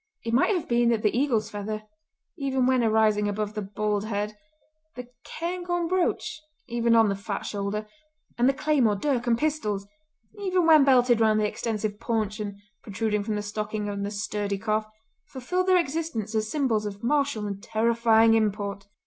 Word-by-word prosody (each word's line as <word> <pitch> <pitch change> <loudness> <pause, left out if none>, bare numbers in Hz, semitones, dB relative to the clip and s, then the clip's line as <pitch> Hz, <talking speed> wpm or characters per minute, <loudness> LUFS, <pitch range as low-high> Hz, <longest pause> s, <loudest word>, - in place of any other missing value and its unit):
It 230 -1 -3
might 275 - +3
have 345 - -3
been 240 0 +3
that 230 -2 +1
the 210 - +2
eagle's 245 -5 +1
feather, 215 +1 -4 0.5
even 265 -3 0
when 255 -1 +3
arising 215 -2 +3
above 210 +1 -2
the 210 - -3
bald 205 +1 -2
head, 210 0 -3 0.6
the 250 -1 -8
cairngorm 350 +1 -3
brooch 340 -3 -1 0.3
even 235 -1 +2
on 225 -1 +6
the 200 - 0
fat 200 0 -5
shoulder, 205 +1 -3 0.5
and 245 +2 +3
the - - +2
claymore, 270 -7 +2
dirk 245 +2 -1
and 230 -1 +3
pistols, 235 -10 -1 0.5
even 370 -3 +1
when 315 -3 +7
belted 245 -3 +4
round 215 -1 +4
the 210 - +2
extensive 215 -1 -3
paunch 220 -3 -2
and 205 -1 -4 0.3
protruding 210 0 -1
from 215 0 -2
the 210 - -3
stocking 210 0 -3
on 200 0 -4
the 200 - -2
sturdy 205 -1 -3
calf, 215 +1 -1 0.4
fulfilled 360 +9 -2
their 370 -1 +5
existence 295 - -2
as 215 -1 0
symbols 230 -8 0
of 200 +1 -8
martial 275 -4 +1
and 200 -1 -5
terrifying 225 0 +3
import! 200 -2 -1
220 Hz, 175 wpm, -26 LUFS, 210-260 Hz, 0.6 s, when